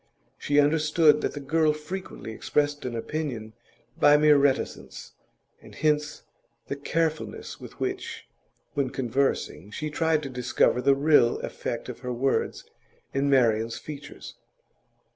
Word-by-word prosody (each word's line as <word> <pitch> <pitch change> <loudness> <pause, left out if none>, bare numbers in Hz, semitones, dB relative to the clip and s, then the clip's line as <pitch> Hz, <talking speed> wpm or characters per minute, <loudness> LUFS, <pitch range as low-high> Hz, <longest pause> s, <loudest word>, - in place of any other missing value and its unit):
She 145 0 +2
understood 150 +1 +4
that - - -2
the 145 - -5
girl 155 +2 +2
frequently 155 -5 -7
expressed 145 +5 -1
an 120 -2 -3
opinion 115 -4 -4 0.5
by 145 0 +7
mere 150 0 +6
reticence, 140 -1 -1 0.5
and - - -14
hence 150 -1 0 0.4
the - - -4
carefulness 160 +2 -2
with - - -12
which, - - -4 0.5
when 140 -2 0
conversing, 130 -6 -1
she 155 +7 -5
tried 160 0 +1
to 135 - -5
discover 125 0 +1
the 135 +2 +4
real 140 -4 +4
effect - - -5
of - - -7
her 125 0 -5
words 130 +3 -1 0.5
in 140 +1 +1
Marian's 115 -4 +2
features. 145 -1 -9
145 Hz, 130 wpm, -26 LUFS, 130-150 Hz, 0.5 s, by